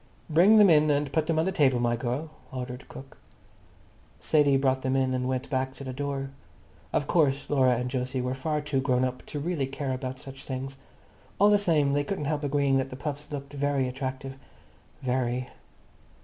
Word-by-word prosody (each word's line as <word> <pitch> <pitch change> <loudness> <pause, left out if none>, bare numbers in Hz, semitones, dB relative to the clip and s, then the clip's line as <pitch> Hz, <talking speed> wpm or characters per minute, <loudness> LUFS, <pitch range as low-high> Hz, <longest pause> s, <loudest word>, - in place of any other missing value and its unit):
"Bring 185 +8 +6
them 210 -1 +8
in 155 -1 +5
and 145 -1 +1
put 160 -2 +1
them 165 -1 +1
on 160 - +2
the 190 - 0
table, 135 -8 +3
my 120 0 +1
girl," 125 +6 -3 0.2
ordered 125 -1 -6
cook. 135 +1 -11 1.0
Sadie 145 -3 +3
brought 130 -1 +1
them 130 0 0
in 130 -1 +1
and 125 0 -1
went 130 0 -2
back 130 0 -1
to 140 - -8
the 130 -1 -5
door. 135 0 -3 0.6
Of 145 - 0
course 145 -4 +2
Laura 130 -3 +4
and 125 +1 -3
Jose 130 0 -2
were 125 0 -1
far 150 +3 -2
too 145 -3 0
grown 130 -2 +1
up 125 0 -4
to 150 - -4
really 150 -3 -1
care 135 0 -3
about 130 0 -4
such 135 0 -10
things. 135 0 -5 0.6
All 205 +1 +5
the 205 - +5
same, 155 -7 +2
they 145 0 +2
couldn't 150 0 -3
help 150 0 -1
agreeing 140 -1 +2
that 135 0 -1
the 130 - -7
puffs 145 +2 -5
looked 140 0 -6
very 140 -2 0
attractive. 130 +1 -5 0.7
Very. 125 -1 -1
135 Hz, 195 wpm, -27 LUFS, 130-150 Hz, 1.0 s, them